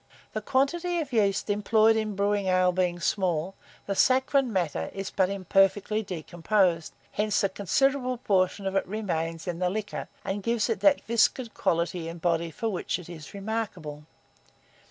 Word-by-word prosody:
The 215 Hz, -, -2 dB
quantity 335 Hz, -, 0 dB
of 290 Hz, -5 st, -4 dB
yeast 205 Hz, -3 st, +2 dB
employed 215 Hz, +2 st, +3 dB
in 215 Hz, -2 st, -1 dB
brewing 200 Hz, 0 st, +1 dB
ale 185 Hz, 0 st, +3 dB
being 180 Hz, -1 st, 0 dB
small, 180 Hz, -1 st, 0 dB, 0.3 s
the 200 Hz, -, -1 dB
saccharine 265 Hz, +3 st, +3 dB
matter 165 Hz, -, -1 dB
is 195 Hz, 0 st, -4 dB
but 190 Hz, -2 st, +2 dB
imperfectly 195 Hz, +2 st, +2 dB
decomposed: 175 Hz, -1 st, 0 dB, 0.2 s
hence 210 Hz, -1 st, 0 dB
a 200 Hz, -, +3 dB
considerable 255 Hz, -, +1 dB
portion 195 Hz, -3 st, +1 dB
of 195 Hz, 0 st, -2 dB
it 195 Hz, -, +1 dB
remains 165 Hz, -6 st, -3 dB
in 175 Hz, -1 st, -3 dB
the 180 Hz, -1 st, +1 dB
liquor, 210 Hz, +2 st, -4 dB, 0.2 s
and 200 Hz, +1 st, -2 dB
gives 230 Hz, +2 st, 0 dB
it 225 Hz, -, -1 dB
that 290 Hz, -1 st, +4 dB
viscid 235 Hz, +1 st, +1 dB
quality 170 Hz, 0 st, -1 dB
and 165 Hz, +1 st, -7 dB
body 170 Hz, 0 st, 0 dB
for 225 Hz, +8 st, -4 dB
which 195 Hz, -5 st, -2 dB
it 180 Hz, -2 st, -11 dB
is 160 Hz, +1 st, -10 dB
remarkable. 195 Hz, -8 st, -4 dB
195 Hz, 160 wpm, -27 LUFS, 175-220 Hz, 0.3 s, that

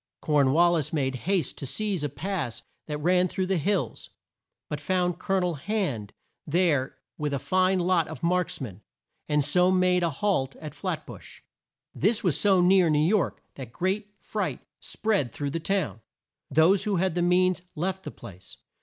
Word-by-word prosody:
Corn 145 Hz, -3 st, +2 dB
wal 170 Hz, +4 st, +5 dB
lis 160 Hz, -5 st, 0 dB
made 135 Hz, -4 st, 0 dB, 0.2 s
haste 185 Hz, -8 st, 0 dB
to 140 Hz, -, -5 dB
seize 190 Hz, +3 st, -1 dB
a 145 Hz, -, -1 dB
pass 145 Hz, -, -4 dB, 0.2 s
that 150 Hz, -1 st, -3 dB
ran 180 Hz, +4 st, +3 dB
through 185 Hz, +1 st, -2 dB
the 185 Hz, -2 st, 0 dB
hills, 200 Hz, +6 st, -1 dB, 0.6 s
but -, -, -5 dB
found 180 Hz, -2 st, 0 dB
Col 195 Hz, -, -1 dB
o -, -, +3 dB
nel 180 Hz, -1 st, 0 dB
Hand 145 Hz, -, -2 dB, 0.4 s
there 150 Hz, -5 st, +1 dB, 0.2 s
with 150 Hz, -2 st, -1 dB
a -, -, 0 dB
fine 185 Hz, +6 st, +2 dB
lot 175 Hz, -2 st, +2 dB
of -, -, -9 dB
marks 180 Hz, 0 st, 0 dB
men, 105 Hz, -7 st, -7 dB, 0.5 s
and 150 Hz, -2 st, +2 dB
so 180 Hz, +5 st, +3 dB
made 185 Hz, -1 st, +3 dB
a 170 Hz, -, +2 dB
halt 140 Hz, -5 st, -1 dB
at 155 Hz, -3 st, -8 dB
Flat -, -, -4 dB
bush. -, -, -12 dB, 0.5 s
This 210 Hz, +6 st, +1 dB
was 175 Hz, -7 st, +2 dB
so 195 Hz, -3 st, +4 dB
near 180 Hz, -1 st, +5 dB
New 150 Hz, -, +3 dB
York 175 Hz, +6 st, +1 dB
that 130 Hz, -4 st, -9 dB
great 200 Hz, -, -2 dB
fright 190 Hz, -10 st, -3 dB, 0.2 s
spread 200 Hz, -, -1 dB
through 145 Hz, +2 st, -4 dB
the 165 Hz, -, -2 dB
town. 160 Hz, -, -1 dB, 0.5 s
Those 160 Hz, +7 st, +4 dB
who 210 Hz, -2 st, +1 dB
had 185 Hz, 0 st, +1 dB
the 175 Hz, -, 0 dB
means 180 Hz, +1 st, +3 dB
left 185 Hz, +4 st, -2 dB
the -, -, -7 dB
place. 90 Hz, 0 st, -12 dB
175 Hz, 180 wpm, -26 LUFS, 145-185 Hz, 0.6 s, wal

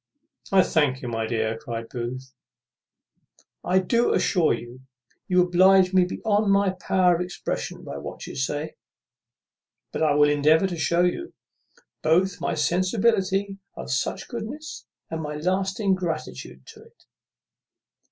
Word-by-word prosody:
"I 190 Hz, -1 st, +6 dB
thank 140 Hz, -5 st, +1 dB
you, -, -, -4 dB
my 115 Hz, -1 st, -2 dB
dear," 110 Hz, -1 st, -1 dB
cries 115 Hz, -4 st, -5 dB
Booth; 130 Hz, +2 st, -6 dB, 1.3 s
"I 185 Hz, -, +2 dB
do 235 Hz, +6 st, +2 dB
assure 175 Hz, -5 st, +2 dB
you, 120 Hz, +2 st, -5 dB, 0.5 s
you 180 Hz, -1 st, +4 dB
oblige 185 Hz, +1 st, +4 dB
me 185 Hz, -1 st, +5 dB
beyond 205 Hz, +2 st, 0 dB
my 200 Hz, -1 st, +3 dB
power 185 Hz, -1 st, +2 dB
of 170 Hz, -, -1 dB
expression 180 Hz, 0 st, -5 dB
by 70 Hz, -, -7 dB
what 70 Hz, -, -8 dB
you -, -, -8 dB
say; 145 Hz, +3 st, -3 dB, 1.1 s
but -, -, -4 dB
I 150 Hz, -2 st, +3 dB
will 145 Hz, 0 st, +5 dB
endeavour 150 Hz, +4 st, +3 dB
to 185 Hz, -2 st, -2 dB
shew 170 Hz, +2 st, +2 dB
you, 345 Hz, -, -3 dB, 0.7 s
both 180 Hz, +4 st, +2 dB
my -, -, -1 dB
sensibility 195 Hz, +3 st, +1 dB, 0.2 s
of -, -, -7 dB
such 165 Hz, +8 st, -2 dB
goodness, 255 Hz, +7 st, -7 dB, 0.2 s
and 160 Hz, 0 st, -3 dB
my 150 Hz, -1 st, -5 dB
lasting 190 Hz, +5 st, 0 dB
gratitude 165 Hz, -, -5 dB
to -, -, -16 dB
it." -, -, -22 dB
180 Hz, 140 wpm, -24 LUFS, 145-190 Hz, 1.3 s, I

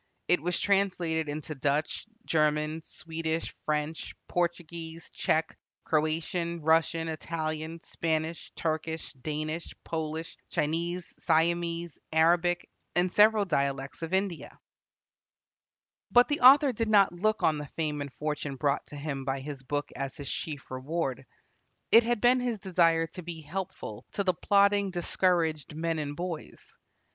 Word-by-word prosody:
It 180 Hz, -3 st, +3 dB
was 180 Hz, +2 st, 0 dB
translated 180 Hz, -6 st, +1 dB
into 155 Hz, +1 st, -4 dB
Dutch, 145 Hz, +7 st, -1 dB, 0.2 s
German, 155 Hz, 0 st, +1 dB
Swedish, 160 Hz, 0 st, -4 dB
French, 150 Hz, +1 st, -2 dB
Portuguese, 170 Hz, -1 st, -3 dB
Czech, 160 Hz, +1 st, 0 dB, 0.3 s
Croatian, 165 Hz, +2 st, 0 dB
Russian, 165 Hz, +1 st, +3 dB
Italian, 160 Hz, 0 st, -3 dB
Spanish, 160 Hz, 0 st, -2 dB
Turkish, 160 Hz, 0 st, -2 dB
Danish, 155 Hz, +4 st, -4 dB
Polish, 160 Hz, 0 st, -4 dB
Chinese, 170 Hz, +4 st, -1 dB
Siamese, 170 Hz, 0 st, +1 dB
Arabic, 170 Hz, +2 st, +3 dB, 0.3 s
and 180 Hz, +1 st, +2 dB
several 210 Hz, 0 st, +5 dB
dialects 140 Hz, -4 st, -1 dB
of 165 Hz, 0 st, -4 dB
India. 190 Hz, -3 st, -1 dB, 1.5 s
But 245 Hz, +3 st, +6 dB
the 290 Hz, -, +1 dB
author 270 Hz, +2 st, +8 dB
did 225 Hz, 0 st, -1 dB
not 200 Hz, -4 st, +5 dB
look 215 Hz, +5 st, 0 dB
on 155 Hz, -2 st, +3 dB
the 150 Hz, -, -6 dB
fame 150 Hz, -3 st, -1 dB
and 140 Hz, -1 st, -5 dB
fortune 150 Hz, +1 st, -3 dB
brought 140 Hz, +1 st, 0 dB
to -, -, -10 dB
him 140 Hz, -2 st, -4 dB
by 135 Hz, 0 st, -1 dB
his 140 Hz, -1 st, -6 dB
book 145 Hz, +2 st, -3 dB
as 135 Hz, +3 st, -4 dB
his 145 Hz, -2 st, -4 dB
chief 145 Hz, -5 st, -5 dB
reward. 135 Hz, 0 st, -2 dB, 0.7 s
It 230 Hz, -, +9 dB
had 240 Hz, -1 st, 0 dB
been 250 Hz, +1 st, +5 dB
his 245 Hz, -3 st, -1 dB
desire 170 Hz, -4 st, +3 dB
to 180 Hz, -, -6 dB
be 170 Hz, -1 st, -7 dB
helpful 155 Hz, -, -6 dB
to 200 Hz, -, 0 dB
the 185 Hz, -1 st, +2 dB
plodding, 200 Hz, +2 st, +3 dB
discouraged 170 Hz, -4 st, 0 dB
men 165 Hz, 0 st, -1 dB
and 145 Hz, -1 st, -3 dB
boys. 170 Hz, -2 st, -6 dB
165 Hz, 135 wpm, -29 LUFS, 150-175 Hz, 1.5 s, It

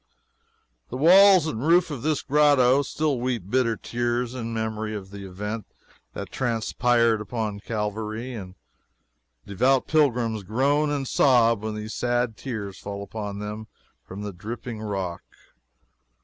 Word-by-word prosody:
The -, -, -5 dB
walls 185 Hz, +3 st, +7 dB
and 135 Hz, -8 st, -3 dB
roof 170 Hz, +1 st, +4 dB
of 135 Hz, -5 st, -5 dB
this 155 Hz, 0 st, 0 dB
grotto 140 Hz, -2 st, +4 dB
still 145 Hz, -1 st, -1 dB
weep 120 Hz, -6 st, -3 dB
bitter 125 Hz, -3 st, +2 dB
tears 120 Hz, +1 st, -2 dB
in 115 Hz, -3 st, -5 dB
memory 110 Hz, -1 st, -3 dB
of 95 Hz, -2 st, -8 dB
the 100 Hz, -1 st, -8 dB
event 105 Hz, +3 st, -5 dB, 0.5 s
that -, -, -7 dB
transpired 115 Hz, -2 st, +1 dB
on 110 Hz, -4 st, -2 dB
Calvary, 110 Hz, +3 st, -4 dB
and 95 Hz, -5 st, -8 dB, 0.9 s
devout 125 Hz, +7 st, +2 dB
pilgrims 120 Hz, -8 st, +1 dB
groan 140 Hz, +9 st, +1 dB
and 140 Hz, -2 st, -2 dB
sob 115 Hz, -6 st, +4 dB
when 110 Hz, 0 st, -4 dB
these 105 Hz, 0 st, -6 dB
sad 120 Hz, -2 st, 0 dB
tears 105 Hz, -6 st, -6 dB
fall 100 Hz, 0 st, -6 dB
upon 105 Hz, -1 st, -6 dB
them 105 Hz, +1 st, -6 dB, 0.4 s
from 100 Hz, +2 st, -8 dB
the 105 Hz, -1 st, -5 dB
dripping 110 Hz, +4 st, -7 dB
rock. 95 Hz, -5 st, -3 dB
115 Hz, 135 wpm, -25 LUFS, 105-130 Hz, 0.9 s, walls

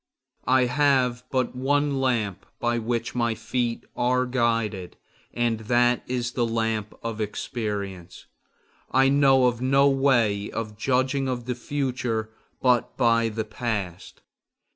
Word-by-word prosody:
I 130 Hz, 0 st, +4 dB
have 125 Hz, -2 st, +2 dB
but 130 Hz, -2 st, -1 dB
one 140 Hz, +2 st, +1 dB
lamp 110 Hz, -7 st, -1 dB
by 120 Hz, 0 st, 0 dB
which 115 Hz, +1 st, -2 dB
my 120 Hz, -2 st, 0 dB
feet 120 Hz, 0 st, -2 dB
are 125 Hz, +1 st, +1 dB
guided, 115 Hz, -7 st, -1 dB, 0.3 s
and 120 Hz, -2 st, 0 dB
that 120 Hz, +2 st, +2 dB
is 125 Hz, -1 st, -2 dB
the 120 Hz, -1 st, 0 dB
lamp 110 Hz, -2 st, -2 dB
of 115 Hz, -1 st, -4 dB
experience. 100 Hz, -4 st, -5 dB, 0.6 s
I 135 Hz, +1 st, +4 dB
know 135 Hz, -2 st, +5 dB
of 120 Hz, -1 st, +1 dB
no 135 Hz, +2 st, +4 dB
way 120 Hz, -7 st, +2 dB
of 110 Hz, -2 st, -5 dB
judging 130 Hz, +3 st, 0 dB
of 120 Hz, -2 st, -3 dB
the 125 Hz, -, -1 dB
future 125 Hz, -4 st, -2 dB, 0.3 s
but 125 Hz, -2 st, +2 dB
by 115 Hz, -2 st, +3 dB
the 110 Hz, 0 st, -3 dB
past. 105 Hz, -5 st, -4 dB
120 Hz, 130 wpm, -25 LUFS, 110-130 Hz, 0.6 s, know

